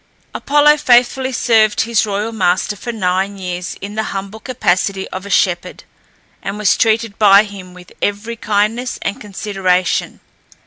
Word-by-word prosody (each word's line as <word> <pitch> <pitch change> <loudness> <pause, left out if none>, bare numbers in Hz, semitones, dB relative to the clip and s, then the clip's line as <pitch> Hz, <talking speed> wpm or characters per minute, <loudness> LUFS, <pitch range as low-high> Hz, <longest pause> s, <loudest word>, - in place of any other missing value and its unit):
Apollo 295 +1 +3
faithfully 260 -1 +3
served 220 -3 +2
his 225 -2 +1
royal 205 +2 -2
master 190 -1 0
for 240 +4 -6
nine 195 -2 -1
years 180 -1 -5
in 200 +1 -6
the 220 0 -2
humble 200 +3 -7
capacity 195 -5 -1
of 185 +1 -7
a - - -8
shepherd, 180 -2 0 0.6
and 195 +1 -5
was 210 -3 +2
treated 225 -2 0
by 200 -1 +7
him 195 -3 -11
with 180 0 -15
every 205 +3 -2
kindness 220 +3 -1
and 200 - -3
consideration. 195 -3 -1
205 Hz, 145 wpm, -16 LUFS, 190-225 Hz, 0.6 s, by